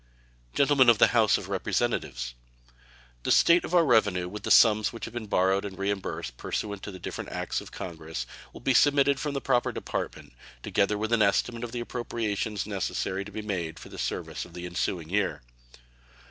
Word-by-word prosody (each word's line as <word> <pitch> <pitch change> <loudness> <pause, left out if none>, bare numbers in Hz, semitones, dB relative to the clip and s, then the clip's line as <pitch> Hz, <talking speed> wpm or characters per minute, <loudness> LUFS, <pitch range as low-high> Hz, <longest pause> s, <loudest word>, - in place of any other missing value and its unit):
Gentlemen 140 -3 +5
of 115 - +6
the - - +6
House 110 -4 +4
of - - -7
Representatives: - - -1 0.9
The - - -1
state 170 +1 +5
of 180 - -2
our 170 -2 +6
revenue, 100 - +3
with 105 +3 -7
the - - -4
sums 110 -2 +6
which 115 - -6
have 115 - -9
been 120 -3 -5
borrowed 95 0 +2
and 100 -2 -6
reimbursed 100 -11 -3
pursuant 100 -2 -4
to 100 -2 -7
different 90 - -6
acts - - -3
of - - -12
Congress, 80 -7 -6 0.3
will - - -12
be 135 - +2
submitted 140 +1 +4
from 145 +1 -3
the 140 - -2
proper 125 -2 +1
Department, - - -5 0.3
together 105 +1 +1
with 110 +2 -2
an 115 - +3
estimate 115 +3 +1
of 120 - -5
the 120 0 -3
appropriations 110 -4 -3
necessary 100 -1 -2
to 105 - -10
be 110 +1 -5
made 90 -6 -3
for - - -11
the - - -10
service - - -3
of 85 - -13
the 90 0 -6
ensuing 85 -1 -3
year. 100 -9 0
105 Hz, 190 wpm, -27 LUFS, 95-120 Hz, 0.9 s, of